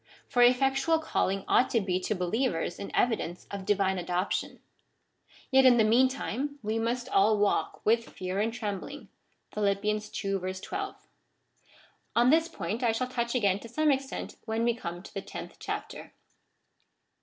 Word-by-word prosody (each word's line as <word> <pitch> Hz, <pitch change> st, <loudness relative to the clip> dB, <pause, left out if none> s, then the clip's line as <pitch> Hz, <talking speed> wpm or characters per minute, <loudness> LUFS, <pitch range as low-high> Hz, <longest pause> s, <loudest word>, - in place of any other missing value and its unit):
For 245 Hz, -3 st, +1 dB
efiectual 270 Hz, +6 st, +4 dB
calling 195 Hz, -10 st, -1 dB
ought 255 Hz, -, +4 dB
to 230 Hz, -, +2 dB
be 185 Hz, -3 st, 0 dB
to 200 Hz, +3 st, -2 dB
believers 180 Hz, -2 st, -1 dB
an 200 Hz, -, -5 dB
evidence 215 Hz, -7 st, 0 dB
of 200 Hz, -1 st, -5 dB
divine 190 Hz, -2 st, +2 dB
adoption; 180 Hz, +2 st, -2 dB, 0.9 s
yet 265 Hz, 0 st, +6 dB
in 255 Hz, -2 st, +7 dB
the 225 Hz, -, +5 dB
meantime 260 Hz, +4 st, +1 dB
we 215 Hz, +2 st, -1 dB
must 240 Hz, +2 st, -1 dB
all 210 Hz, +2 st, +4 dB
walk 205 Hz, 0 st, 0 dB
luith 230 Hz, +2 st, +3 dB
fear 185 Hz, +1 st, -4 dB
and 220 Hz, +2 st, +1 dB
trembling 225 Hz, +5 st, -5 dB, 0.4 s
(Phil, 210 Hz, -1 st, +1 dB
ii. 210 Hz, +2 st, +1 dB
12.) 195 Hz, -, -4 dB, 1.2 s
On 240 Hz, +2 st, +5 dB
this 325 Hz, +1 st, +4 dB
point 240 Hz, -, -4 dB
I 235 Hz, -2 st, +2 dB
shall 255 Hz, +3 st, -2 dB
touch 235 Hz, -1 st, -2 dB
ao 250 Hz, -, +2 dB
ain 195 Hz, -1 st, +3 dB
to 230 Hz, -, -11 dB
some 305 Hz, +5 st, +2 dB
extent 270 Hz, 0 st, -3 dB
when 225 Hz, 0 st, -1 dB
we 235 Hz, 0 st, +3 dB
come 175 Hz, -6 st, -6 dB
to -, -, -12 dB
the 195 Hz, -, -3 dB
tenth -, -, -9 dB
chapter. -, -, -6 dB
225 Hz, 160 wpm, -29 LUFS, 195-255 Hz, 1.2 s, in